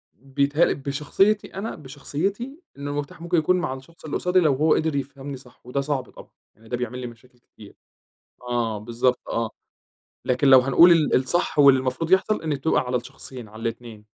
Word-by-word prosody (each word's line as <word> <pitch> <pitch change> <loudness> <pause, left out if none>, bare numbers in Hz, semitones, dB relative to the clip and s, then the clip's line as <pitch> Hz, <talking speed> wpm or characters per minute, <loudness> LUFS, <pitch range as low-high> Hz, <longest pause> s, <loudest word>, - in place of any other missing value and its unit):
بتهيأ 140 +4 +1
بشخصيتي 150 +9 0
أنا، 200 +4 -4
بشخصيتي 180 - -4 0.2
إن 140 0 -6
المفتاح 145 +2 -5
ممكن 170 0 0
يكون 160 +4 +3
مع 175 -7 -2
الشخص 135 +6 -13
اللي 150 - -4
قُصادي 180 +1 +2
لو 155 -5 +3
هو 155 +4 +3
قدِر 155 -2 0
يفهَمني 140 0 -5
صح، 125 -1 -19
وده 140 +3 -2
صعب 140 -2 -3
طبعًا، - - -14 0.3
يعني 110 +1 -19
ده 120 - -2
بيعمل 125 +1 -4
لي 125 - -5
مشاكل 120 +1 -16
كتير. 105 -3 -17 0.7
آه 120 -3 -2
بالضبط، 120 +3 0
آه، 115 -1 -1 0.8
لكن 130 +2 +2
لو 130 -1 +9
هنقول 165 +7 +6
ال 160 -3 +3
الصح 150 +6 0
واللي 140 -2 +7
المفروض 130 +6 -3
يحصَل 190 +1 +3
إنه 155 -3 -1
تبقى 150 +4 +1
على 125 0 -2
الشخصين، 125 -1 -8
على 110 +2 -12
الإتنين، 115 -2 -6
140 Hz, 180 wpm, -24 LUFS, 125-160 Hz, 0.8 s, لو